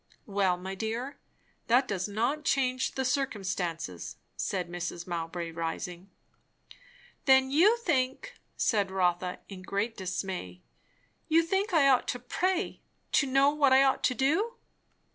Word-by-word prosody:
"Well, 195 -3 +1
my 190 +2 -6
dear, 230 +7 -4 0.5
that 250 +3 +4
does 190 -2 -2
not 240 +9 -1
change 260 -4 +1
the 265 - -1
circumstances," 190 - -2 0.2
said 185 -3 -2
Mrs. 175 0 -5
Mowbray 170 -1 -4
rising. 170 +3 -5 1.2
"Then 265 -1 +5
you 380 +11 +5
think" 320 - -1 0.2
said 205 -4 +1
Rotha 180 -1 0
in 190 -2 -9
great 200 +5 -2
dismay 180 - -5 0.6
"you 330 +1 +4
think 385 +4 0
I 315 -5 +5
ought 260 -2 +4
to 245 - -2
pray, 365 - -1 0.3
to 280 - +3
know 275 +2 +4
what 285 -3 +3
I 265 +1 +7
ought 270 -1 +2
to 255 - +2
do?" 330 - +1
235 Hz, 135 wpm, -29 LUFS, 185-275 Hz, 1.2 s, I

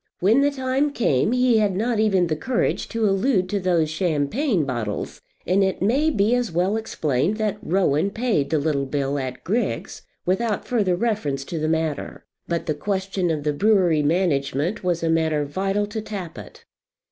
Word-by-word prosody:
When 220 +9 +4
the 285 - +4
time 270 +1 -1
came 205 - +1
he 250 -2 +3
had 205 -3 +1
not 225 +3 0
even 195 -5 +3
the 160 -2 -1
courage 240 +10 -1
to 225 -1 -1
allude 195 -1 +2
to 205 - 0
those 170 -4 +1
champagne 175 - 0
bottles; 120 -6 -4 0.2
and 190 +3 +3
it 190 0 0
may 265 +11 +2
be 215 -5 +2
as 245 -4 0
well 180 +5 +1
explained 170 - -1
that 215 -2 -1
Rowan 180 -1 +1
paid 215 - 0
the 160 - +1
little 140 -2 0
bill 140 0 -1
at 130 -1 -5
Griggs's, 225 +7 -2 0.2
without 210 +3 0
further 205 -7 +1
reference 175 - -1
to 165 - -4
the 155 - -1
matter. 160 -2 -2 0.2
But 170 -1 -2
the 155 - 0
question 190 +2 -2
of 155 -3 -1
the 150 0 0
brewery 185 -3 +3
management 155 +2 0
was 175 -2 0
a - - +1
matter 160 -2 +1
vital 195 +7 -1
to 215 +2 -5
Tappitt. 195 -6 -8
185 Hz, 175 wpm, -23 LUFS, 155-215 Hz, 0.2 s, When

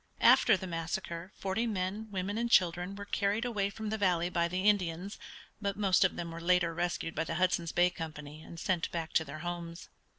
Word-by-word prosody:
After 220 -4 +7
the 190 - -6
massacre 170 +1 -4
forty 195 +5 -1
men, 205 +1 -2
women, 200 +2 -2
and 235 0 0
children 180 -1 +3
were 200 0 -7
carried 205 +3 0
away 205 -5 0
from 215 +1 -5
the 220 - -2
valley 180 -3 +2
by 170 -1 +2
the 185 +2 -2
Indians, 190 -1 +1 0.4
but 200 -1 -2
most 195 -3 +4
of 190 - +2
them 170 -1 -5
were 165 0 -7
later 170 -1 +3
rescued 170 -1 -2
by 160 - 0
the 165 - -4
Hudson's 175 -1 +1
Bay 175 +1 +3
Company 155 -3 -7
and 165 +1 -10
sent 175 -1 0
back 165 -1 -4
to 160 - +3
their 155 0 -8
homes. 170 -1 -5
180 Hz, 205 wpm, -31 LUFS, 170-200 Hz, 0.4 s, After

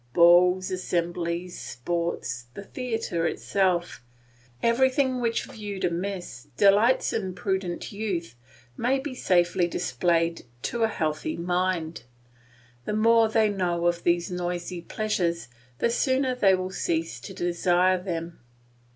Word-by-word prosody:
Balls, 180 +3 +5
assemblies, 175 -1 -2
sports, 125 -4 -3
the 200 - -7
theatre 225 -8 -2
itself; 175 -3 0 0.6
everything 260 +2 +2
which 230 -1 0
viewed 205 -3 -5
amiss 175 -7 -4
delights 205 - +4
imprudent 190 -2 -2
youth 195 - -3 0.4
may 250 - +1
be 270 0 -5
safely 175 -5 +2
displayed 165 +4 0 0.2
to 235 - -2
a 225 - +4
healthy 155 -6 -2
mind. 175 -4 -1 0.8
The - - -2
more 225 +1 +4
they 220 -1 +3
know 175 -4 -1
of 175 0 +1
these 175 +2 +1
noisy 175 0 -3
pleasures, 170 - -2 0.3
the 235 - +1
sooner 260 +1 +1
they 200 -6 +4
will 185 0 -4
cease 165 -8 -2
to - - -9
desire 175 +1 +2
them. 170 -2 -5
180 Hz, 115 wpm, -26 LUFS, 170-210 Hz, 0.8 s, Balls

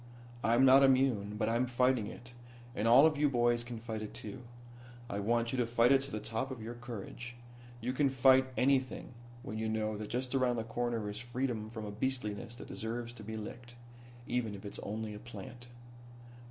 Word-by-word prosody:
"I'm 120 +5 +5
not 135 +1 +8
immune, 130 -7 +3
but 110 - 0
I'm 120 +3 +1
fighting 125 -2 +2
it, 125 +3 -10 0.4
and 110 - 0
all 125 +6 +8
of 155 -2 +3
you 150 -1 +4
boys 120 -2 +2
can 120 -1 -6
fight 110 -1 -5
it 105 - -7
too. 110 +4 -7 0.7
I 100 - -3
want 115 +3 +1
you 130 - -1
to 120 - +3
fight 120 +1 +4
it 135 -1 +6
to 135 +1 -6
the 110 - -2
top 115 +5 -3
of 130 -3 -6
your 115 +2 -6
courage. 120 0 -7 0.5
You 125 +3 -1
can 140 +1 +3
fight 130 0 +5
anything 130 -1 +1 0.3
when 110 +1 -5
you 110 0 -1
know 110 -1 -1
that 105 0 -6
just 125 +1 -2
around 130 -2 +2
the 115 - -2
corner 115 -1 -2
is 105 +1 -4
freedom 120 -2 -3
from 110 -1 -6
a 105 - -5
beastliness 110 -1 -3
that - - -10
deserves 115 +2 -4
to 115 -3 -11
be 110 +1 -5
licked 120 +3 -8 0.5
even 115 -5 -1
if 100 - -10
it's 100 - -5
only 110 +1 -4
a 105 - -8
plant. 120 +2 -10
120 Hz, 205 wpm, -33 LUFS, 110-130 Hz, 0.7 s, not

